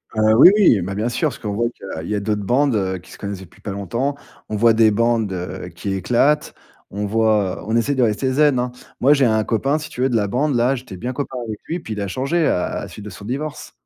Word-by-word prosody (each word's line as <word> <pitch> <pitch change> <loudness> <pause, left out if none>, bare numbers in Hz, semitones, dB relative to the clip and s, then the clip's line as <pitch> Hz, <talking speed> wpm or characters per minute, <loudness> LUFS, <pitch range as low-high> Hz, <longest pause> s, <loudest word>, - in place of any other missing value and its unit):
Heu, 110 0 +4
oui 175 - +9
oui, 185 - +5
bah 95 +3 -4
bien 110 +4 -1
sûr, 155 +6 0
parce 125 - -10
qu'on 105 -2 -4
voit 120 +3 0
qu'il 90 -8 -8
y 105 - 0
a - - 0
d'autres 105 0 -1
bandes, 130 +4 +2
heu, 95 -2 -1
qui 90 - -15
se - - -11
connaissent 100 -2 -5
depuis 90 - -15
pas 100 - -5
longtemps. 115 +9 -2 0.3
On 110 - -2
voit 115 +2 +5
des 110 0 +5
bandes, 115 -1 +1
heu, 90 0 -5
qui 90 +4 -5
éclatent, 125 - +1 0.4
on 105 +1 -3
voit, 105 -2 +1
on 110 - 0
essaie 120 +5 +2
de 130 - +2
rester 120 +4 +1
zen, 145 0 +3
hein. 125 0 -1 0.3
Moi, 140 +4 +6
j'ai 140 -2 +3
un 110 -2 +2
copain, 135 +7 0
si 150 - -7
tu - - -11
veux, 130 - +3
de 120 - -1
la 105 -2 +1
bande 135 +7 0
là, 120 +3 +2
j'étais 125 -6 -8
bien 120 +7 -4
copain 130 0 -5
avec 110 -2 -6
lui, 170 - -2
puis 110 - -9
il 105 - -4
a 100 - -2
changé 140 - 0
à 90 - +1
à - - -4
la - - -6
suite 105 - -10
de 105 - -6
son 100 +2 -11
divorce. 145 +6 -5
115 Hz, 275 wpm, -20 LUFS, 100-130 Hz, 0.4 s, oui